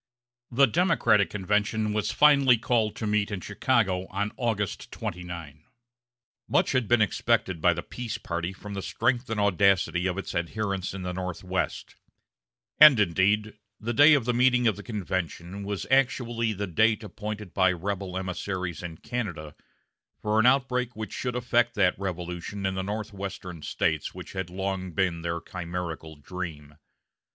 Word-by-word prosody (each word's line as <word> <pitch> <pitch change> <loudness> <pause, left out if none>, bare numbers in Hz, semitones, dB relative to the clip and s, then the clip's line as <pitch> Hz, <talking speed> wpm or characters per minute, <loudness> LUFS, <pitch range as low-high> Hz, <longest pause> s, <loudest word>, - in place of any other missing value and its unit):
The 135 +3 +5
Democratic 135 - +3
convention 105 +2 0
was 105 0 0
finally 140 -4 +6
called 110 -2 +1
to 110 - -4
meet 105 -1 +1
in 100 -3 -3
Chicago 95 -2 0
on 100 +2 -2
August 110 -5 -2
29. 85 -4 -6 0.8
Much - - +2
had 130 -4 +1
been 120 -1 +4
expected 100 -4 0
by 85 0 +4
the 85 - -4
peace 120 -3 -5
party 85 +1 -3
from 100 +2 -9
the 100 - -3
strength 120 +4 0
and 110 -1 -1
audacity 95 -2 +3
of 90 0 -2
its 100 - -5
adherents 95 +2 -2
in 95 - -6
the 90 0 -3
Northwest; 90 0 -3 0.8
and, 150 -6 +9
indeed, 105 +3 +2 0.2
the 115 +2 -3
day 145 +6 +7
of 135 -6 0
the 125 - +1
meeting 125 0 +3
of 110 - +3
the 100 - -8
convention 95 -3 -4
was 100 -1 -3
actually 120 -4 +2
the 100 -1 -3
date 110 +5 +2
appointed 105 -1 -6
by 95 -1 +4
rebel 95 +1 -3
emissaries 95 -2 -4
in 85 -3 -7
Canada 90 - -5 0.7
for 105 +1 +1
an 110 - +5
outbreak 125 -2 +2
which 110 -2 -6
should 125 -1 -3
effect 120 -1 +1
that 95 -3 +3
revolution 90 +1 -4
in 95 - 0
the 95 - -2
northwestern 100 -4 -5
States - - -1
which - - -9
had 95 -2 -4
long 95 -1 -3
been 90 -2 0
their 85 0 -2
chimerical 85 -2 -6
dream. 75 -1 -7
100 Hz, 155 wpm, -27 LUFS, 90-110 Hz, 0.8 s, and